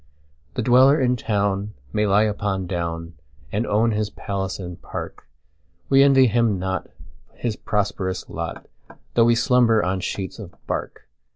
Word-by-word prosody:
The 125 - -1
dweller 130 +5 +6
in 125 -1 +2
town 100 -2 -1 0.2
may 105 0 +1
lie 100 +2 +4
upon 100 -3 -1
down, 85 -2 -4 0.4
And 105 +4 -1
own 110 +3 +2
his 105 -1 -1
palace 95 -2 -4
and 90 -2 -8
park:We 75 - -3
envy 135 -1 +6
him 115 -3 +2
not 95 +1 -3 0.5
his 115 -3 -3
prosperous 100 -3 -2
lot, - - -6 0.5
Though 115 - +5
we 120 0 +4
slumber 115 -2 +3
on 95 +1 -1
sheets 95 +2 -4
of 95 -5 -10
bark. - - -5
105 Hz, 145 wpm, -23 LUFS, 95-115 Hz, 0.5 s, dweller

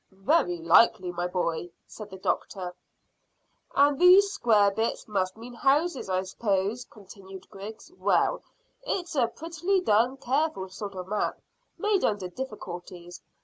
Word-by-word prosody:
"Very 195 - +1
likely, 180 +2 +4
my 175 0 -2
boy," 175 -1 -2 0.2
said 215 -2 -10
the 190 - -9
doctor. 185 -1 -3 1.0
"And 285 0 +4
these 380 +3 +7
square 210 - +3
bits 220 +3 -2
must 190 -2 -1
mean 240 +2 -10
houses, 275 - +1
I 185 0 0
s'pose," 200 +3 -1
continued 195 -2 -13
Griggs. 215 - -10
"Well, - - +1 0.4
it's 365 -9 -3
a 255 -6 +2
prettily 335 +9 -1
done, 245 - +2
careful 270 -6 -1
sort 195 +1 -7
of 185 -1 -6
map, 210 +1 -2 0.4
made 415 -2 +1
under 205 -4 0
difficulties. 175 -6 -8
210 Hz, 135 wpm, -27 LUFS, 190-275 Hz, 1.0 s, these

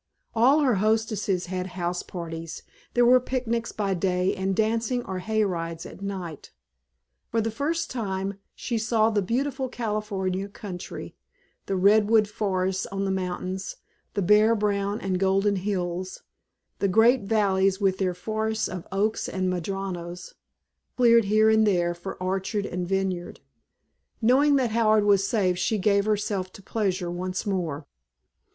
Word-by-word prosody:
All 260 +7 +4
her 265 -4 +3
hostesses 215 -3 0
had 185 0 -3
house 175 0 -1
parties, 165 -2 -7 0.3
there 240 0 +5
were 250 +1 +7
picnics 240 -2 -2
by 200 -2 -1
day 180 0 0
and 190 0 -1
dancing 230 +3 0
or 190 -1 -4
hay 220 +3 0
rides 165 -4 -3
at - - -11
night. 185 -6 -6 0.8
For 230 - 0
the 225 0 0
first 305 +9 -2
time 195 -4 -3 0.2
she 235 -2 -2
saw 220 0 +2
the 210 -2 +1
beautiful 260 +6 -1
California 205 -5 -2
country; 195 -3 -8 0.5
the 195 - -1
redwood 210 +3 +4
forests 190 -2 -1
on 195 0 -3
the 195 - 0
mountains, 185 0 -3 0.4
the 200 - +1
bare 210 +4 +5
brown 205 0 0
and 185 -2 -1
golden 195 +1 +2
hills, 185 -1 -3 0.6
the 200 - +2
great 225 +4 +4
valleys 195 -2 +2
with 190 -2 +1
their 185 -2 0
forests 220 +3 -2
of 185 -2 -7
oaks 205 +3 0
and 185 -1 -1
madronas 180 -1 -5 0.6
cleared 235 -3 +5
here 215 +2 +4
and 220 0 +4
there 175 -3 +2
for 175 +3 -7
orchard 195 +3 -2
and 180 -2 -3
vineyard; 190 -2 -2 0.8
knowing 270 +5 +4
that 255 -4 +1
Howard 215 -2 +3
was 200 -1 +3
safe 185 -5 +1
she 220 - +1
gave 200 0 +2
herself 205 -3 -1
to 200 - -13
pleasure 185 -5 -1
once 185 +1 -3
more. 170 -7 -2
200 Hz, 145 wpm, -26 LUFS, 185-220 Hz, 0.8 s, were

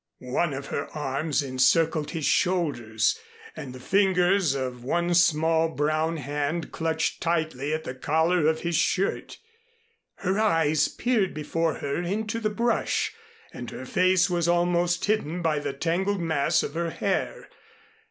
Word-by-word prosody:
One 155 -3 +1
of 140 +1 -6
her 145 - -3
arms 145 +1 -1
encircled 150 +4 +2
his 160 -3 -3
shoulders 145 - +1 0.4
and 130 - -7
the 130 - -10
fingers 185 -1 +2
of 125 -2 -4
one 170 +6 0
small 165 -1 +3
brown 155 +2 0
hand 145 +3 -3
clutched 160 0 -1
tightly 155 -4 -1
at 155 0 -2
the - - -5
collar 160 +5 +1
of 160 0 +1
his 170 -1 -1
shirt. 190 +4 0 0.8
Her 195 +2 -1
eyes 165 -8 +3
peered 215 - 0
before 165 +2 -1
her 140 +4 -3
into 215 +5 -2
the 215 -2 0
brush, 235 +2 0 0.4
and - - -7
her - - -8
face 185 0 +3
was 175 -2 0
almost 175 +1 +1
hidden 180 -5 -1
by 155 -2 +1
the 145 -1 -3
tangled 175 +8 -1
mass 160 -1 +1
of - - -5
her 170 +1 -1
hair. 200 - -2
165 Hz, 145 wpm, -26 LUFS, 150-180 Hz, 0.8 s, small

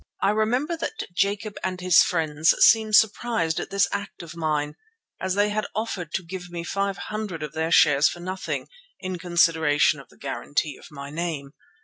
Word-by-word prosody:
I 195 - +2
remember 245 +10 0
that 440 - -4
Jacob 200 +3 -1
and 185 -1 -2
his 180 -1 +6
friends 160 -2 +2
seemed 220 -1 +5
surprised 220 -6 +2
at - - -5
this 195 0 +2
act 200 -3 -5
of 165 -1 -10
mine, 150 -2 -1 0.5
as 190 0 -1
they 205 +1 +3
had 215 +1 -2
offered 200 -7 -3
to 190 - -2
give 180 +1 -7
me 170 -1 -5
five 195 +2 -2
hundred 210 -7 -5
of 150 -1 -6
their 160 0 -1
shares 145 -2 +5
for 175 - -8
nothing 185 +2 -4 0.3
"in 185 -2 -5
consideration 160 -4 +3
of 135 - -14
the - - -21
guarantee 145 +1 -2
of - - -14
my 140 -1 -9
name." 155 -4 -4
180 Hz, 180 wpm, -24 LUFS, 155-205 Hz, 0.5 s, his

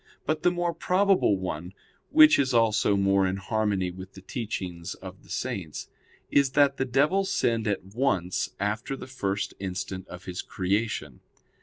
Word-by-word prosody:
But 155 0 0
the 180 - +4
more 175 -1 -1
probable 185 - +3
one, 90 0 -5 0.3
which 310 - +7
is 130 -3 +1
also 110 -3 +3
more 100 -1 +3
in 95 - -1
harmony 100 -2 0
with 95 +1 -10
the 95 - -12
teachings 95 -5 -5
of 95 0 -11
the - - -21
Saints, 85 -6 -4 0.4
is 140 -2 +3
that 140 -1 +4
the 130 - 0
devil 145 +10 +2
sinned 115 - 0
at 100 -3 -1
once 100 -8 0
after 105 +6 -2
the - - -8
first 100 -6 -3
instant 95 0 -4
of 90 +1 -10
his 90 -1 -4
creation. 95 - -2
105 Hz, 160 wpm, -27 LUFS, 95-135 Hz, 0.4 s, which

